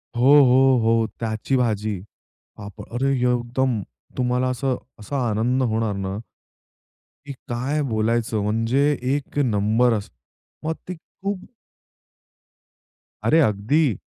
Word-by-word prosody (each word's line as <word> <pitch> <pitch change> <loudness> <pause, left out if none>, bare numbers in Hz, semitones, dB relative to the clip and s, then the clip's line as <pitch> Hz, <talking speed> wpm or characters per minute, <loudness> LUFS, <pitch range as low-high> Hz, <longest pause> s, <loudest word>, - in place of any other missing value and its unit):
हो, 130 +4 +5
हो. 130 0 +5
हो. 115 0 +3
त्याची 110 +3 -2
भाजी. 110 -4 0 0.6
पाप 100 -3 -9
अरे 135 +3 +1 0.2
एकदम 120 -1 0 0.4
तुम्हाला 125 0 +1
असं, 130 +1 -1 0.2
असा 140 +7 -4
आनंद 120 +5 +1
होणार 110 -2 0
ना. 95 0 -3 1.1
की 140 - -7 0.2
काय 130 +6 -1
बोलायचं 110 0 0
म्हणजे 115 +5 +1 0.3
एक 145 0 -6
नंबर 115 0 +2
अस 105 -2 -3 0.6
मग 160 - 0
ती 185 - -4
खूप 195 +3 -6 1.8
अरे 160 - +4
अगदी. 115 - +2
120 Hz, 110 wpm, -23 LUFS, 110-135 Hz, 1.8 s, हो